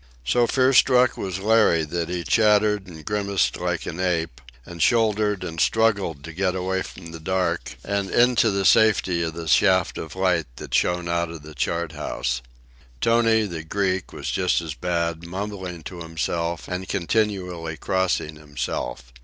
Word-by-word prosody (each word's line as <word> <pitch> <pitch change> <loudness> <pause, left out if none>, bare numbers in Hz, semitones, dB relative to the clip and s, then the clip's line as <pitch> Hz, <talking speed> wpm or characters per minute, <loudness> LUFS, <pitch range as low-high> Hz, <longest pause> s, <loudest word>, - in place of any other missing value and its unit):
So 120 - +3
fear 130 +1 +3
struck 125 0 +5
was 95 -2 -4
Larry 105 -5 +3
that 85 +2 -3
he 90 -1 -3
chattered 105 +3 +3
and 80 -3 -11
grimaced 100 -2 0
like - - -2
an 85 - -5
ape, 85 -7 -1 0.2
and 85 -1 -8
shouldered 105 -2 +2
and 80 -3 -3
struggled 100 -10 +1
to 85 - -8
get 90 +1 0
away 95 +1 -1
from 85 -3 -9
the 80 - -8
dark 95 +3 -2
and 100 -1 -1
into 120 -2 +4
the 100 -1 0
safety 95 -6 +4
of 80 -1 -2
the 85 -1 -6
shaft 95 +3 +3
of 80 +1 -7
light 90 -4 +1
that - - -9
shone 90 -1 +1
out 85 0 0
of 80 -3 -9
the 75 0 -11
chart 85 +4 -2
house. - - -3 0.6
Tony, 115 - +3
the 85 -5 -5
Greek, 95 +2 -1
was - - -5
just 90 -1 +1
as 80 -3 -5
bad, 85 0 -2
mumbling 95 -2 -5
to 90 0 -8
himself 85 +1 -3
and 90 +1 -5
continually 90 -5 -1
crossing 90 -5 -1
himself. 65 -5 -5
90 Hz, 165 wpm, -23 LUFS, 80-100 Hz, 0.6 s, struck